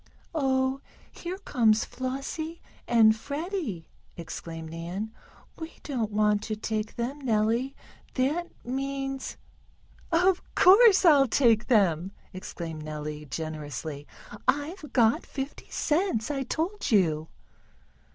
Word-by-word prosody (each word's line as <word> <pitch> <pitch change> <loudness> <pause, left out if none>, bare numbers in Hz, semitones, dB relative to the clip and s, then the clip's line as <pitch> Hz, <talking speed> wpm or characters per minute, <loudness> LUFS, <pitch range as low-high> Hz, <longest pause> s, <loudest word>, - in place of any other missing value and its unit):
"Oh, 265 -2 +1 0.3
here 360 +2 -6
comes 225 - +2
Flossie 275 +6 -4 0.3
and 220 -2 +6
Freddie!" 285 - -4 0.3
exclaimed 165 -1 -7
Nan. 175 +6 -5 0.5
"We 320 0 -6
don't 240 -7 -2
want 210 0 +2
to 215 - -2
take 215 0 -3
them, 250 +5 -3
Nellie. 235 +2 +1 0.4
That 295 +7 +1 0.2
means 270 +1 -3 0.4
" - - -29 0.2
"Of 380 -2 +3
course 395 +1 +7
I'll 285 -5 +7
take 230 -3 +3
them!" 190 -5 +3 0.2
exclaimed 170 -4 -6
Nellie, 150 0 -5
generously. 150 0 -5 0.4
"I've 295 +5 -1
got 230 -3 +3
fifty 270 +1 -6
cents, 300 - 0
I 275 -2 -1
told 340 - -2
you." 160 -7 +3
240 Hz, 110 wpm, -28 LUFS, 190-285 Hz, 0.5 s, course